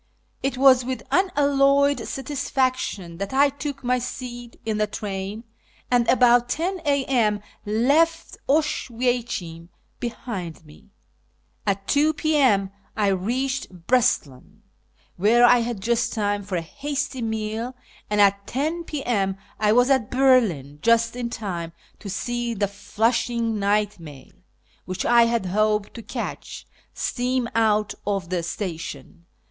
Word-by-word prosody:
It 265 Hz, -1 st, -1 dB
was 260 Hz, -1 st, +6 dB
with 255 Hz, +1 st, -4 dB
unalloyed 280 Hz, -5 st, +3 dB
satisfaction 255 Hz, -, -2 dB
that 200 Hz, +6 st, -4 dB
I 280 Hz, +1 st, +5 dB
took 285 Hz, 0 st, -6 dB
my 250 Hz, +1 st, +1 dB
seat 245 Hz, -1 st, -7 dB
in 215 Hz, -1 st, -1 dB
the 210 Hz, -, +2 dB
train, 205 Hz, +1 st, -5 dB, 0.5 s
and, 240 Hz, -2 st, +3 dB
about 245 Hz, -1 st, +4 dB
10 350 Hz, +7 st, -1 dB
a.m., 260 Hz, -7 st, +2 dB, 0.3 s
left 290 Hz, +10 st, +2 dB
Oswiecim 240 Hz, -, -1 dB, 0.3 s
behind 195 Hz, -9 st, -6 dB
me. 150 Hz, +6 st, -18 dB, 0.8 s
At 195 Hz, 0 st, -1 dB
2 300 Hz, +2 st, +3 dB
P.M. 260 Hz, -12 st, +2 dB, 0.3 s
I 205 Hz, -2 st, +2 dB
reached 225 Hz, -1 st, -2 dB
Breslau, 160 Hz, -, +2 dB, 0.8 s
where 225 Hz, +6 st, +5 dB
I 245 Hz, 0 st, +6 dB
had 230 Hz, -3 st, -3 dB
just 235 Hz, +3 st, 0 dB
time 205 Hz, -2 st, 0 dB
for 195 Hz, -1 st, -5 dB
a 170 Hz, -, 0 dB
hasty 280 Hz, -, -4 dB
meal, 220 Hz, +2 st, -3 dB, 0.3 s
and 210 Hz, 0 st, 0 dB
at 200 Hz, 0 st, +3 dB
10 315 Hz, +6 st, -2 dB
p.m. 210 Hz, -11 st, -1 dB, 0.2 s
I 210 Hz, 0 st, +3 dB
was 245 Hz, +4 st, +4 dB
at 260 Hz, -6 st, +2 dB
Berlin, 220 Hz, -, +2 dB
just 230 Hz, 0 st, +3 dB
in 245 Hz, -1 st, -3 dB
time 175 Hz, -8 st, -5 dB, 0.3 s
to 205 Hz, -, -8 dB
see 240 Hz, +3 st, -2 dB
the 200 Hz, 0 st, 0 dB
Flushing 225 Hz, +2 st, -1 dB
night 205 Hz, 0 st, +1 dB
mail, 145 Hz, -5 st, -12 dB, 0.5 s
which 185 Hz, 0 st, -4 dB
I 235 Hz, -1 st, +6 dB
had 230 Hz, -4 st, 0 dB
hoped 210 Hz, +2 st, +1 dB
to 230 Hz, -, -8 dB
catch, -, -, -6 dB, 0.3 s
steam 250 Hz, 0 st, -1 dB
out 215 Hz, -2 st, +2 dB
of 195 Hz, -4 st, -2 dB
the 180 Hz, -2 st, 0 dB
station. 170 Hz, -1 st, -6 dB
230 Hz, 130 wpm, -24 LUFS, 200-260 Hz, 0.8 s, was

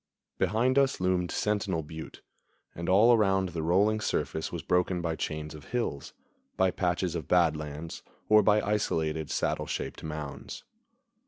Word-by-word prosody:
Behind 115 Hz, +8 st, +2 dB
us 135 Hz, -1 st, +2 dB
loomed 90 Hz, -1 st, +1 dB
Sentinel 100 Hz, -6 st, -1 dB
Butte, 80 Hz, +1 st, -9 dB, 0.5 s
and 85 Hz, +1 st, -4 dB
all 105 Hz, +6 st, +6 dB
around 95 Hz, -4 st, +2 dB
the 85 Hz, -2 st, -4 dB
rolling 100 Hz, +7 st, +3 dB
surface 80 Hz, -6 st, -2 dB
was 85 Hz, -3 st, -5 dB
broken 90 Hz, 0 st, +1 dB
by 85 Hz, -2 st, -2 dB
chains 75 Hz, -1 st, -4 dB
of 75 Hz, -3 st, -11 dB
hills, 115 Hz, -, -3 dB, 0.5 s
by 95 Hz, -1 st, +3 dB
patches 90 Hz, -1 st, -1 dB
of 80 Hz, -6 st, -4 dB
bad 85 Hz, -3 st, +4 dB
lands, 75 Hz, +2 st, -6 dB, 0.3 s
or 110 Hz, 0 st, +7 dB
by 105 Hz, +1 st, +4 dB
isolated, 80 Hz, -7 st, -1 dB
saddle -, -, -1 dB
shaped -, -, -4 dB
mounds. 75 Hz, -2 st, -6 dB
90 Hz, 150 wpm, -29 LUFS, 80-105 Hz, 0.5 s, or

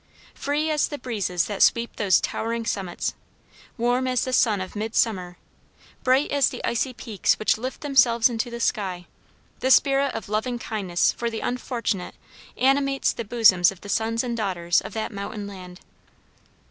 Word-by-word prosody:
Free 300 Hz, +2 st, -1 dB
as 300 Hz, -2 st, +2 dB
the 290 Hz, -, -6 dB
breezes 200 Hz, -9 st, -1 dB
that 205 Hz, -2 st, -4 dB
sweep 235 Hz, 0 st, +3 dB
those 195 Hz, -3 st, +4 dB
towering 230 Hz, +1 st, -3 dB
summits, 190 Hz, -5 st, -2 dB, 0.6 s
warm 245 Hz, +2 st, +1 dB
as 255 Hz, -2 st, +1 dB
the 255 Hz, -, -3 dB
sun 220 Hz, -5 st, +3 dB
of 185 Hz, +2 st, -6 dB
midsummer, 210 Hz, -4 st, -1 dB, 0.7 s
bright 260 Hz, +3 st, +3 dB
as 285 Hz, -2 st, +3 dB
the -, -, -6 dB
icy 235 Hz, +3 st, 0 dB
peaks 225 Hz, -4 st, 0 dB
which 215 Hz, -, +2 dB
lift 255 Hz, +4 st, -6 dB
themselves 240 Hz, -5 st, +4 dB
into 240 Hz, 0 st, -3 dB
the 235 Hz, 0 st, -6 dB
sky, 185 Hz, -6 st, -1 dB, 0.5 s
the 260 Hz, -, 0 dB
spirit 275 Hz, 0 st, +4 dB
of 225 Hz, -, -5 dB
loving 220 Hz, +4 st, -1 dB
kindness 195 Hz, -7 st, 0 dB
for 235 Hz, -, -3 dB
the 225 Hz, -1 st, -5 dB
unfortunate 235 Hz, -6 st, -3 dB, 0.4 s
animates 275 Hz, +1 st, +2 dB
the 235 Hz, -, -5 dB
bosoms 200 Hz, -6 st, +5 dB
of 195 Hz, -, -14 dB
the 205 Hz, -, -10 dB
sons 225 Hz, +2 st, 0 dB
and 240 Hz, -2 st, -2 dB
daughters 175 Hz, -5 st, +1 dB
of -, -, -9 dB
that 220 Hz, +1 st, -3 dB
mountain 200 Hz, 0 st, -6 dB
land. 185 Hz, -2 st, -10 dB
230 Hz, 165 wpm, -24 LUFS, 200-255 Hz, 0.7 s, bosoms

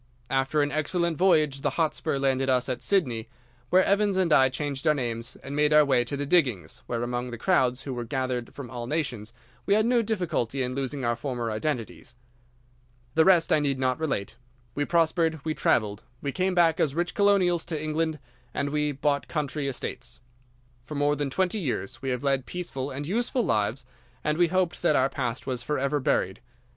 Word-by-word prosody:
After 135 Hz, +3 st, +2 dB
an 145 Hz, -, -1 dB
excellent 165 Hz, +3 st, 0 dB
voyage 155 Hz, -7 st, +3 dB
the -, -, -2 dB
Hotspur 160 Hz, -3 st, 0 dB
landed 135 Hz, -1 st, +1 dB
us 125 Hz, -1 st, +2 dB
at 130 Hz, -2 st, -3 dB
Sydney, 125 Hz, -, 0 dB, 0.4 s
where 185 Hz, +1 st, +5 dB
Evans 200 Hz, -1 st, +2 dB
and 180 Hz, -4 st, +3 dB
I 135 Hz, -2 st, +6 dB
changed 140 Hz, +2 st, -3 dB
our 155 Hz, -, +5 dB
names 120 Hz, -1 st, -3 dB
and 140 Hz, +1 st, -6 dB
made 150 Hz, +1 st, +3 dB
our 150 Hz, 0 st, +7 dB
way 130 Hz, -3 st, +3 dB
to 140 Hz, +3 st, -4 dB
the 145 Hz, -, -2 dB
diggings, 135 Hz, -, +1 dB
where, 120 Hz, -1 st, -2 dB
among 120 Hz, +1 st, -3 dB
the 120 Hz, -, -6 dB
crowds 125 Hz, -3 st, +2 dB
who 135 Hz, -, -4 dB
were 120 Hz, -1 st, -3 dB
gathered 125 Hz, -1 st, -3 dB
from 130 Hz, -5 st, -8 dB
all 120 Hz, -2 st, -5 dB
nations, 125 Hz, -8 st, -2 dB, 0.4 s
we 200 Hz, -, +4 dB
had 215 Hz, 0 st, +3 dB
no 240 Hz, 0 st, +3 dB
difficulty 165 Hz, -, -1 dB
in 125 Hz, 0 st, -2 dB
losing 135 Hz, 0 st, -3 dB
our 120 Hz, 0 st, +1 dB
former 120 Hz, -2 st, -3 dB
identities. 120 Hz, 0 st, -4 dB, 1.0 s
"'The 160 Hz, +1 st, +4 dB
rest 175 Hz, -4 st, +5 dB
I -, -, +4 dB
need 140 Hz, -2 st, 0 dB
not 130 Hz, 0 st, 0 dB
relate. 120 Hz, -8 st, -2 dB, 0.4 s
We 145 Hz, -, -1 dB
prospered, 165 Hz, -1 st, +2 dB
we 155 Hz, -, 0 dB
travelled, 105 Hz, -7 st, +1 dB, 0.2 s
we 140 Hz, -, -3 dB
came 185 Hz, +4 st, 0 dB
back 165 Hz, -2 st, +4 dB
as 140 Hz, -2 st, +1 dB
rich 175 Hz, +1 st, -1 dB
colonials 195 Hz, -4 st, +3 dB
to 160 Hz, -3 st, -3 dB
England, 155 Hz, +1 st, -1 dB, 0.4 s
and 140 Hz, 0 st, -1 dB
we 150 Hz, 0 st, 0 dB
bought 140 Hz, +1 st, 0 dB
country 150 Hz, -2 st, -2 dB
estates. 135 Hz, -, -5 dB, 0.6 s
For 150 Hz, +5 st, -8 dB
more 145 Hz, +1 st, +2 dB
than 145 Hz, -1 st, -2 dB
twenty 190 Hz, +8 st, 0 dB
years 125 Hz, -, -3 dB
we 135 Hz, -, -3 dB
have 125 Hz, 0 st, -2 dB
led 135 Hz, -2 st, 0 dB
peaceful 145 Hz, -7 st, -4 dB
and 140 Hz, +2 st, -5 dB
useful 235 Hz, -, 0 dB
lives, 110 Hz, +3 st, 0 dB, 0.4 s
and 150 Hz, +2 st, 0 dB
we 175 Hz, -, +5 dB
hoped 185 Hz, 0 st, 0 dB
that 155 Hz, -, +3 dB
our 130 Hz, 0 st, +3 dB
past 125 Hz, -3 st, -3 dB
was 125 Hz, -3 st, -2 dB
forever 140 Hz, +2 st, 0 dB
buried. 95 Hz, -5 st, 0 dB
145 Hz, 195 wpm, -26 LUFS, 125-165 Hz, 1.0 s, our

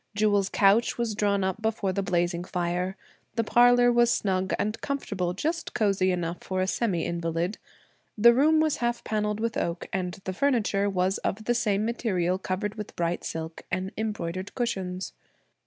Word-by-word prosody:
Jewel's 205 Hz, -2 st, +2 dB
couch 205 Hz, +4 st, +3 dB
was 235 Hz, -2 st, -1 dB
drawn 200 Hz, -1 st, +1 dB
up 190 Hz, +3 st, -2 dB
before 220 Hz, -3 st, 0 dB
the 200 Hz, -, 0 dB
blazing 175 Hz, -1 st, 0 dB
fire; 180 Hz, +1 st, -2 dB, 0.4 s
the 230 Hz, -, +1 dB
parlor 245 Hz, +2 st, +5 dB
was 240 Hz, 0 st, +4 dB
snug 190 Hz, -4 st, 0 dB
and 215 Hz, +2 st, -2 dB
comfortable, 200 Hz, -11 st, -2 dB
just 325 Hz, -, -3 dB
cosey 195 Hz, -4 st, +2 dB
enough 175 Hz, -1 st, -3 dB
for 185 Hz, 0 st, -2 dB
a 185 Hz, -, +2 dB
semi 190 Hz, -3 st, 0 dB
invalid. 170 Hz, +3 st, -2 dB, 0.6 s
The 235 Hz, +3 st, +7 dB
room 305 Hz, +5 st, +4 dB
was 310 Hz, -1 st, +2 dB
half 240 Hz, 0 st, -1 dB
panelled 210 Hz, -1 st, -1 dB
with 230 Hz, 0 st, -1 dB
oak, 170 Hz, 0 st, -2 dB
and 180 Hz, -2 st, -1 dB
the 190 Hz, -, -3 dB
furniture 210 Hz, -4 st, +1 dB
was 190 Hz, 0 st, 0 dB
of 215 Hz, +3 st, -3 dB
the 240 Hz, -, +1 dB
same 215 Hz, -3 st, +1 dB
material 190 Hz, -6 st, 0 dB
covered 195 Hz, +2 st, -2 dB
with 210 Hz, -, -7 dB
bright 170 Hz, 0 st, -1 dB
silk 160 Hz, 0 st, -5 dB
and 185 Hz, +1 st, -2 dB
embroidered 205 Hz, -3 st, -4 dB
cushions. 190 Hz, -7 st, -3 dB
200 Hz, 170 wpm, -27 LUFS, 180-225 Hz, 0.6 s, The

